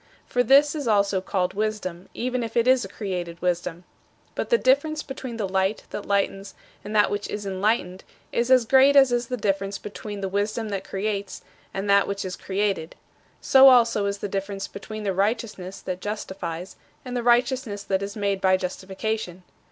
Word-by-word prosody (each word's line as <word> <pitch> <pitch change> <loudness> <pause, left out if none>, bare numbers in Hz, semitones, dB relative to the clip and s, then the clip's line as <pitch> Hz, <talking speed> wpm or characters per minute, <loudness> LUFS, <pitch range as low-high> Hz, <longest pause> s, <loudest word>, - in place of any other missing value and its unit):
For 245 - +1
this 280 +3 +5
is 295 -5 -4
also 200 -3 +2
called 185 -1 -1
wisdom, 200 -4 -3
even 250 +1 -1
if 230 0 -4
it 235 +1 +3
is 260 -1 +5
a - - -5
created 180 -4 -5
wisdom. 175 -1 -2 0.5
But - - -3
the 470 - +5
difference 305 - +2
between 260 -3 -7
the 210 -3 -1
Light 190 +2 0
that 205 - -6
lightens 195 -1 -1 0.3
and 210 +1 -6
that 210 - +4
which 205 0 -2
is 205 0 -4
enlightened 190 -1 -1 0.3
is 235 +1 0
as 255 -2 +5
great 270 +4 +5
as 270 -2 +7
is 240 0 0
the 250 - -3
difference 195 -1 -1
between 205 0 -7
the 195 - -1
Wisdom 210 +3 -2
that 195 -2 -3
creates 200 0 -4 0.3
and 195 +1 -4
that 200 0 +4
which 200 -1 -3
is 185 - -4
created. 195 -4 -2 0.5
So 270 0 +8
also 230 -5 +4
is 200 0 -2
the 205 - -4
difference 195 0 -4
between 215 +2 -8
the 195 -2 0
Righteousness 200 -2 -2
that 185 0 -5
justifies 190 -4 -5 0.3
and 250 -1 -5
the 245 - 0
righteousness 240 -3 +1
that 190 0 0
is 200 0 -5
made 200 -2 -1
by 185 -1 +4
justification. 190 0 -4
205 Hz, 185 wpm, -24 LUFS, 190-235 Hz, 0.5 s, So